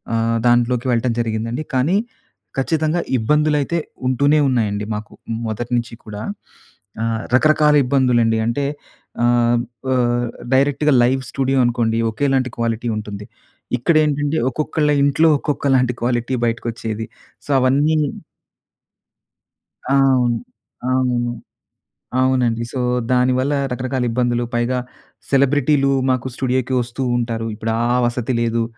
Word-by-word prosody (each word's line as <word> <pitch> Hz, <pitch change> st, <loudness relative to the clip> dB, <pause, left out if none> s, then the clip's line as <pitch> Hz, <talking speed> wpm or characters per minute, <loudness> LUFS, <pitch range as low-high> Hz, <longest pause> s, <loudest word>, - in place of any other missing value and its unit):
ఆహ్, 115 Hz, 0 st, +1 dB
దాంట్లోకి 120 Hz, +1 st, +2 dB
వెళ్ళటం 120 Hz, 0 st, +1 dB
జరిగిందండి. 115 Hz, +5 st, -2 dB
కానీ 155 Hz, +10 st, +2 dB, 0.6 s
ఖచ్చితంగా 155 Hz, +4 st, 0 dB, 0.2 s
ఇబ్బందులైతే 150 Hz, +6 st, +1 dB, 0.3 s
ఉంటూనే 140 Hz, +4 st, +3 dB
ఉన్నాయండి 105 Hz, -4 st, 0 dB
మాకు 105 Hz, 0 st, -7 dB, 0.4 s
మొదటి 115 Hz, +3 st, -4 dB
నుంచి 120 Hz, 0 st, -3 dB
కూడా. 105 Hz, -1 st, -7 dB, 0.8 s
ఆహ్, 115 Hz, 0 st, -1 dB
రకరకాల 150 Hz, +1 st, +4 dB
ఇబ్బందులండి 125 Hz, -4 st, +2 dB
అంటే 140 Hz, +5 st, -1 dB, 0.6 s
ఆహ్, 120 Hz, 0 st, +3 dB, 0.3 s
ప -, -, -4 dB, 0.7 s
డైరెక్ట్‌గా 145 Hz, +2 st, +3 dB
లైవ్ 130 Hz, +2 st, +2 dB
స్టూడియో 135 Hz, 0 st, 0 dB
అనుకోండి 115 Hz, -1 st, 0 dB
ఒకేలాంటి 130 Hz, +2 st, 0 dB
క్వాలిటీ 115 Hz, 0 st, -1 dB
ఉంటుంది. 105 Hz, -1 st, -6 dB, 0.5 s
ఇక్కడ 155 Hz, +7 st, +1 dB
ఏంటంటే 145 Hz, +1 st, 0 dB
ఒక్కొక్కళ్ళ 150 Hz, +2 st, 0 dB
ఇంట్లో 155 Hz, +3 st, +4 dB
ఒక్కొక్కలాంటి 135 Hz, -4 st, +1 dB
క్వాలిటీ 120 Hz, +1 st, 0 dB
బయటకి 115 Hz, 0 st, -2 dB
వచ్చేది. 110 Hz, -1 st, -5 dB, 0.4 s
సో -, -, -17 dB
అవన్నీను 145 Hz, +4 st, +2 dB, 1.8 s
ఆ! 135 Hz, -, 0 dB
అవును. 130 Hz, -3 st, +3 dB, 0.5 s
అవును, 125 Hz, -2 st, +1 dB, 0.9 s
అవునండి. 125 Hz, -3 st, +1 dB
సో 130 Hz, -, -4 dB, 0.3 s
దానివల్ల 130 Hz, +3 st, +2 dB, 0.2 s
రకరకాల 130 Hz, 0 st, -2 dB
ఇబ్బందులు, 120 Hz, 0 st, 0 dB
పైగా 125 Hz, +2 st, 0 dB, 0.5 s
సెలబ్రిటీలు 140 Hz, 0 st, +3 dB, 0.2 s
మాకు 130 Hz, 0 st, 0 dB
స్టూడియోకి 130 Hz, 0 st, -1 dB
వస్తూ 120 Hz, +3 st, -4 dB
ఉంటారు. 115 Hz, -1 st, -2 dB
ఇప్పుడు 110 Hz, +1 st, -3 dB, 0.2 s
ఆ -, -, +2 dB
వసతి 120 Hz, +1 st, -1 dB
లేదు 115 Hz, 0 st, 0 dB
125 Hz, 115 wpm, -19 LUFS, 115-140 Hz, 1.8 s, రకరకాల